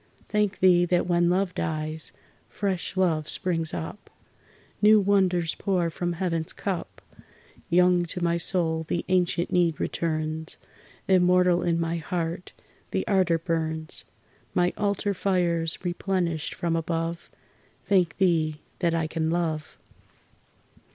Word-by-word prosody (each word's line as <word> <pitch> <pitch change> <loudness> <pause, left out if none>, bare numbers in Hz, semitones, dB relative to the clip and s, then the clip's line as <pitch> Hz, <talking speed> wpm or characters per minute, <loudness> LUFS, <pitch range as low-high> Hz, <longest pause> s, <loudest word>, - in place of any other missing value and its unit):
Thank 210 -2 0
Thee 180 -2 +6
that 175 0 +1
when 175 -1 +2
love 185 +1 +1
dies, 155 -1 -3 0.4
fresh 190 -2 -3
love 160 -5 +1
springs 165 -3 -1
up. 160 +6 -6 0.7
New 215 +1 +7
wonders 185 -4 +2
pour 180 -4 0
from 175 +1 -2
Heaven's 165 -2 -2
cup. 190 -4 -4 0.7
Young 180 0 +4
to 175 +1 -4
my 170 0 +2
soul 165 -2 0
the 170 - -2
ancient 180 -1 +1
need 170 -3 +2
returns, 160 -1 -2 0.5
Immortal 180 -1 +4
in 170 -1 +1
my 165 0 -1
heart 170 +1 -3 0.4
the - - -1
ardor 185 -5 +3
burns; 160 -1 -3 0.5
My 175 0 +2
altar 205 0 0
fires 175 -4 0
replenished 175 -3 -1
from 170 -2 -1
above 165 0 -2 0.6
Thank 185 -4 +2
Thee 160 -5 +2 0.2
that 170 -2 +1
I 165 -1 0
can 160 0 -1
love! 160 -3 -2
175 Hz, 125 wpm, -26 LUFS, 165-180 Hz, 0.7 s, New